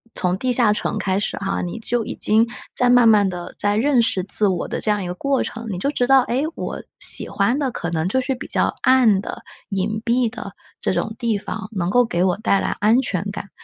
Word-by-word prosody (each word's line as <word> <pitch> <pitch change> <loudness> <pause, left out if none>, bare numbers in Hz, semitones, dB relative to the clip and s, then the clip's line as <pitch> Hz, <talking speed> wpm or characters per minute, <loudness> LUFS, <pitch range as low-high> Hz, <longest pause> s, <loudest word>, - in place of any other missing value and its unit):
从 180 0 0
地 255 +5 -1
下 240 -3 +4
城 210 - -2
开 190 0 0
始 205 - -3
哈， 195 0 -2
你 175 +5 -5
就 230 0 0
已 - - -5
经 220 +2 +3 0.3
在 250 - +2
慢 245 -1 +6
慢 210 -3 +5
地 175 -1 -7
在 205 0 +1
认 250 +3 +3
识 225 -5 0
自 205 +2 +3
我 185 -3 -1
的 - - -3
这 - - -3
样 205 -2 +1
一 - - -4
个 175 - -3
过 275 +8 0
程， 230 0 -7
你 190 - -4
就 275 +11 -1
知 250 -4 0
道， 270 0 +6
哎， 250 +2 -1
我 - - -5 0.2
喜 - - +3
欢 235 +7 0
的 275 -3 0
可 175 - -4
能 165 0 -1
就 260 +7 +1
是 265 +1 -2
比 260 - -8
较 - - 0
暗 245 -6 +4
的、 - - -8 0.3
隐 210 +2 -2
蔽 240 0 +2
的 235 - -8 0.3
这 - - -1
种 220 - -2
地 230 -3 0
方， 215 +2 -6
能 180 -3 -1
够 245 +4 +4
给 175 -5 -1
我 185 -1 +1
带 200 -2 +1
来 - - -1
安 220 +5 +4
全 195 -8 -2
感。 200 0 -7
215 Hz, 265 characters per minute, -21 LUFS, 195-245 Hz, 0.3 s, 慢